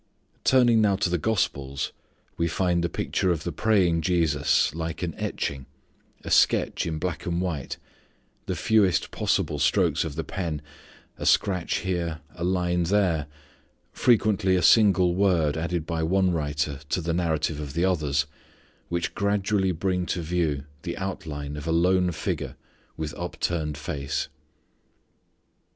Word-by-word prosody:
Turning 120 -4 +5
now 100 -2 +3
to 95 -2 0
the 90 - +2
gospels, 70 -9 -1 0.4
we 85 - 0
find 85 +1 +1
the 85 - 0
picture 95 - -1
of 80 -3 -2
the 85 - -3
praying 90 -2 +2
Jesus 80 -7 +2
like 80 +2 -4
an 85 -2 -2
etching, 70 -2 -3 0.6
a - - -6
sketch - - +3
in 80 -1 -2
black 85 0 -3
and 85 0 0
white, 85 -7 -3 0.7
the 95 - -1
fewest 95 -1 +2
possible 75 - 0
strokes 70 -1 +2
of 80 -3 -5
the 80 - -2
pen, 80 -6 -4 0.6
a - - -4
scratch 90 -4 +2
here, 85 -4 -2
a 85 - -6
line 90 -1 +1
there, 85 -5 +1 0.7
frequently 105 -5 +3
a 90 - +1
single 95 -3 +5
word 90 -6 +2
added 85 0 -2
by 80 -1 -2
one 95 +3 +2
writer 75 -3 -1
to - - 0
the 85 -1 -2
narrative 80 -3 0
of 75 -2 -6
the 85 +2 +2
others, 75 -5 +1 0.6
which 85 -1 -2
gradually 100 -1 +1
bring 90 +1 -1
to 90 - -2
view 80 -4 0 0.2
the 85 -1 -5
outline 75 -6 -5
of 75 +1 -6
a - - +1
lone 90 +2 +3
figure 80 - -3 0.4
with 80 -1 -4
upturned 85 -3 -2
face. 70 -2 -3
85 Hz, 145 wpm, -26 LUFS, 80-95 Hz, 0.7 s, Turning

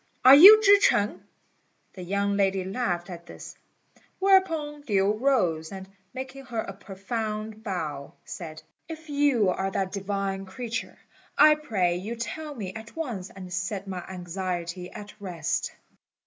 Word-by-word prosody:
are 260 - +10
you 390 +10 +11
Chih 405 0 +7
ch'eng?" 205 - +2 0.7
The 185 - -9
young 200 +2 -1
lady 195 -1 +1
laughed 190 -4 -2
at 170 0 -10
this; - - -10 0.6
whereupon 330 -7 +2
Lin 200 +1 +2
rose, 180 - +1
and, 190 -1 -8 0.2
making 265 +2 -8
her 240 -2 -7
a 195 - -7
profound 215 +2 -5
bow, 155 -9 -5
said, 155 -3 -8 0.3
"If 320 -1 -9
you 280 -8 +2
are 190 +1 -1
that 190 -1 -2
divine 195 -1 -3
creature, 230 +4 -5 0.4
I 305 - +8
pray 195 -13 -1
you 210 +6 -5
tell 295 +6 -6
me 195 -6 -6
at 220 +2 -10
once, 235 - -4
and 185 -2 -10
set 190 +2 -3
my 185 -2 -5
anxiety 180 -1 -5
at 210 0 -10
rest." 180 -4 -2
200 Hz, 145 wpm, -26 LUFS, 185-255 Hz, 0.7 s, you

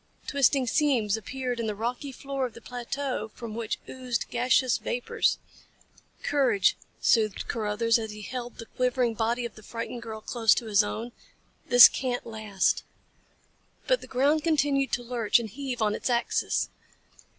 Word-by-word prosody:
Twisting 275 -1 +2
seams 245 -6 +2
appeared 250 +2 -4
in 230 - -1
the 210 - -2
rocky 245 +6 -3
floor 275 0 -3
of 235 - -16
the - - -9
plateau 245 0 -4
from 230 -2 -7
which 225 -1 -3
oozed 250 -2 -3
gaseous 250 +1 +2
vapors. 245 - 0 0.9
"Courage," 255 -9 +3 0.2
soothed 215 -4 +2
Carruthers 230 +1 +1
as 220 -1 -5
he 210 0 -8
held 245 +1 -6
the 230 - -8
quivering 250 -1 0
body 235 +2 -1
of 235 - -6
the 215 - -14
frightened 230 +2 -6
girl 220 -2 -7
close 225 0 +2
to 235 - -3
his 210 -1 +4
own. 225 +3 -4 0.6
"This 245 -2 +11
can't 250 -2 -3
last." 215 -4 0 1.0
But - - +2
the - - -10
ground 285 +4 +2
continued 285 -4 +1
to 245 - 0
lurch 235 -3 +2
and 235 -2 -3
heave 250 +1 -4
on 210 -1 +2
its - - -3
axis. 240 -1 0
240 Hz, 160 wpm, -27 LUFS, 220-260 Hz, 1.0 s, This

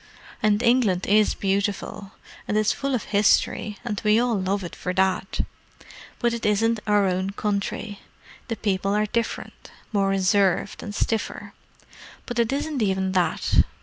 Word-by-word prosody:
And 210 +1 +2
England 235 -7 +3
is 210 +1 +3
beautiful, 200 0 -2 0.3
and 210 - 0
it's 215 +1 +3
full 275 -1 -1
of 235 - -2
history, 205 0 +2
and 210 -4 -3
we 215 +1 +4
all 245 0 +1
love 195 0 -1
it 175 - -7
for 180 -1 -4
that. 190 0 +1 0.8
But 235 -1 +1
it 235 - -4
isn't 220 +2 +2
our 205 -1 +4
own 185 +1 0
country. 205 0 -3 0.5
The 230 - -2
people 195 -1 0
are 210 0 +2
different—more 210 -2 -3
reserved, 195 0 +2
and 205 -2 -6
stiffer. 225 0 -2 0.7
But 245 -1 -3
it 230 0 +2
isn't 285 -1 -2
even 190 -2 +1
that. 185 -2 +2
205 Hz, 150 wpm, -24 LUFS, 195-225 Hz, 0.8 s, we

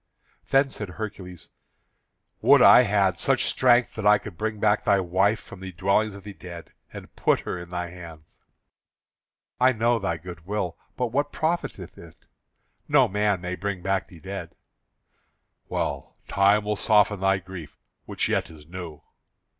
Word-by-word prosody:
Then 135 0 +3
said 105 -6 -6
Hercules: 90 -4 -8 0.9
"Would - - +6
I - - +8
had 100 -5 +2
such - - +2
strength 125 -1 +3
that 110 - -6
I 105 0 +7
could 100 -3 -10
bring 110 +3 -3
back 105 0 +2
thy 100 -1 +3
wife 95 +4 +1
from - - -13
the 95 0 -7
dwellings 100 +4 +1
of 100 - -11
the 105 - -9
dead, 85 -2 -11 0.2
and - - -11
put - - +1
her 90 - -5
in 85 0 -10
thy 90 -1 -4
hands." 85 -3 -13 1.2
"I 130 +1 +5
know 115 +1 +1
thy 85 -5 -2
good 85 0 -10
will, 100 -5 -2 0.2
but 125 -3 -1
what 145 +3 0
profiteth 155 - -3
it? 80 -2 -15 0.6
No - - +5
man 105 -1 0
may 90 0 -4
bring 95 0 -4
back 95 0 -1
the 85 - -15
dead." 95 +3 -7 1.1
"Well, - - -3
time 100 +2 +3
will 105 0 0
soften 105 -1 +3
thy 95 0 +2
grief, 90 -5 -10 0.3
which - - -1
yet - - -1
is 75 -2 -14
new." 85 -3 -9
95 Hz, 160 wpm, -25 LUFS, 90-105 Hz, 1.2 s, I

